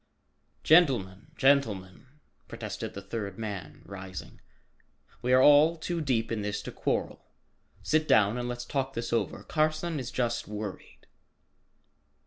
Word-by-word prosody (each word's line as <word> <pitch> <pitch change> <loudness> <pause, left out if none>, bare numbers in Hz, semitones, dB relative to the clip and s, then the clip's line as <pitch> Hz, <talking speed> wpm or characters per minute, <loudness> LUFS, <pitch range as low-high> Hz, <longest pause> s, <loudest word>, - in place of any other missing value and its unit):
"Gentlemen, 125 - +3
gentlemen!" 115 -8 +1 0.4
protested - - -6
the 100 - -7
third 100 -1 -5
man 100 -8 -6
rising, 95 -1 -9 0.8
"we 125 +1 0
are 130 0 +6
all 150 +3 +7
too 170 +1 -3
deep 120 -6 0
in 110 -2 -1
this 105 0 -3
to - - -6
quarrel. - - -2 0.6
Sit 155 0 +1
down 105 +1 +4
and 120 0 -3
let's 120 0 -5
talk 135 0 -2
this 115 0 -3
over. 115 - -1
Carson 155 +1 0
is 125 - -5
just 120 -2 -2
worried." 105 -1 -7
120 Hz, 130 wpm, -29 LUFS, 100-145 Hz, 0.8 s, all